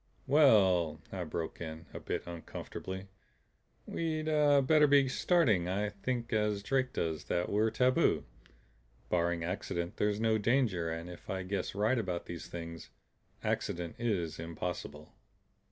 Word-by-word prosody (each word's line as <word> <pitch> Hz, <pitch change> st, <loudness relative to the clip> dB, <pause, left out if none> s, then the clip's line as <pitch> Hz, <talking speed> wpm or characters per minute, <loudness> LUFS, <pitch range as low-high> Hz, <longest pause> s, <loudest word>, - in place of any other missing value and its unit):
"Well," 100 Hz, -, +5 dB
I -, -, -3 dB
broke 80 Hz, 0 st, -4 dB
in, 80 Hz, 0 st, -6 dB
a -, -, -5 dB
bit -, -, -3 dB
uncomfortably, 95 Hz, +2 st, -7 dB, 0.8 s
"we'd 160 Hz, -2 st, -2 dB
better 150 Hz, -1 st, +5 dB
be 140 Hz, -1 st, +5 dB
starting. 130 Hz, -, +2 dB
I 100 Hz, +3 st, 0 dB
think 115 Hz, +4 st, -3 dB
as 105 Hz, -2 st, +1 dB
Drake 130 Hz, +3 st, +1 dB
does, 80 Hz, -2 st, -2 dB
that 85 Hz, -, -1 dB
we're 110 Hz, +2 st, +2 dB
tabu. 125 Hz, +3 st, +3 dB, 0.9 s
Barring 85 Hz, -1 st, +1 dB
accident 85 Hz, -1 st, -3 dB
there's 105 Hz, 0 st, +1 dB
no 110 Hz, -1 st, +2 dB
danger. 105 Hz, -7 st, +2 dB
And 80 Hz, +1 st, -4 dB
if 90 Hz, -1 st, -11 dB
I 95 Hz, -1 st, -2 dB
guess 95 Hz, 0 st, -3 dB
right 110 Hz, +5 st, +2 dB
about 90 Hz, -5 st, -3 dB
these 85 Hz, -1 st, -7 dB
Things, 85 Hz, -2 st, -7 dB, 0.5 s
accident 85 Hz, -1 st, -2 dB
is 90 Hz, -10 st, -1 dB
impossible." 80 Hz, -2 st, -5 dB
100 Hz, 135 wpm, -32 LUFS, 85-125 Hz, 0.9 s, Well